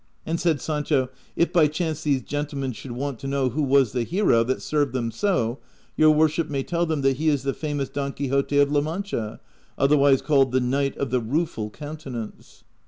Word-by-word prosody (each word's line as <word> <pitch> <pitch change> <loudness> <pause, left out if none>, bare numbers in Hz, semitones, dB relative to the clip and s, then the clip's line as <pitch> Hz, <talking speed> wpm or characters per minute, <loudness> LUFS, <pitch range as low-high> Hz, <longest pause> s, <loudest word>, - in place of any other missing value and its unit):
And 165 +1 -1
said 165 -4 +1
Sancho, 150 -4 0 0.3
"If 170 +1 +1
by 165 -4 +5
chance 155 0 -3
these 140 -5 0
gentlemen 145 -1 -3
should 120 +2 -8
want 135 -1 -4
to 135 - -6
know 135 -1 +1
who 145 +6 -2
was 135 -4 +3
the 125 - -1
hero 140 - +2
that 130 +2 -1
served 145 -4 0
them 120 -3 -1
so, 135 - 0 0.4
your 155 - +5
worship 155 +1 +2
may 140 -2 -1
tell 170 +2 -1
them 155 -3 -1
that 135 -1 +2
he 155 +2 +2
is 145 -3 +1
the 135 0 -1
famous 145 -3 -3
Don 140 -1 -3
Quixote 140 +1 0
of 145 0 +4
La 145 -1 +3
Mancha, 155 - -4 0.4
otherwise 140 -1 +4
called 135 -4 +3
the 130 - +4
Knight 135 +2 0
of 140 -4 -2
the 130 - +2
Rueful 115 -3 -2
Countenance." 145 -4 -8
140 Hz, 200 wpm, -24 LUFS, 130-155 Hz, 0.4 s, by